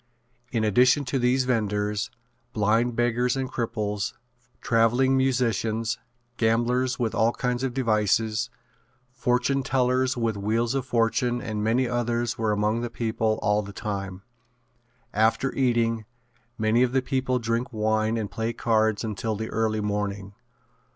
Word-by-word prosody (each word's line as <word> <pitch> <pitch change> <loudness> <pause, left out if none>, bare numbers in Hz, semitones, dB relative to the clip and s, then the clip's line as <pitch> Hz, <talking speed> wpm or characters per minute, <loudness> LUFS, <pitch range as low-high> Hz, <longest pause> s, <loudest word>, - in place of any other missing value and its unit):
In 115 -3 0
addition 125 +7 +4
to 130 +1 -1
these 125 +2 +2
venders, 105 -4 -1 0.4
blind 115 +3 +2
beggars 120 +2 +1
and 130 -1 -1
cripples, 105 -4 -2 0.5
traveling 120 +3 +3
musicians, 115 -3 0 0.4
gamblers 120 +3 +1
with 115 -3 -1
all 115 +1 +3
kinds 125 -1 -2
of 130 -2 -2
devices, 110 -3 +1 0.6
fortune 125 +2 +1
tellers 130 0 +1
with 115 -2 0
wheels 115 +4 0
of 135 -1 -2
fortune 120 +1 +1
and 110 -3 -3
many 120 +4 +2
others 120 -1 -1
were 110 -1 0
among 105 +2 +1
the 120 - -3
people 110 -1 -1
all 105 0 +2
the 100 -1 -9
time. 100 -3 -5 0.9
After 110 +5 +2
eating, 115 -4 +1 0.5
many 110 +2 +2
of 125 0 +2
the 130 -1 +2
people 130 -1 0
drink 115 +2 -2
wine 110 0 0
and 105 -3 -3
play 115 +1 -2
cards 110 -2 +1
until 110 0 -2
the 110 +2 -4
early 110 -1 0
morning. 100 -1 -3
115 Hz, 135 wpm, -25 LUFS, 110-125 Hz, 0.9 s, addition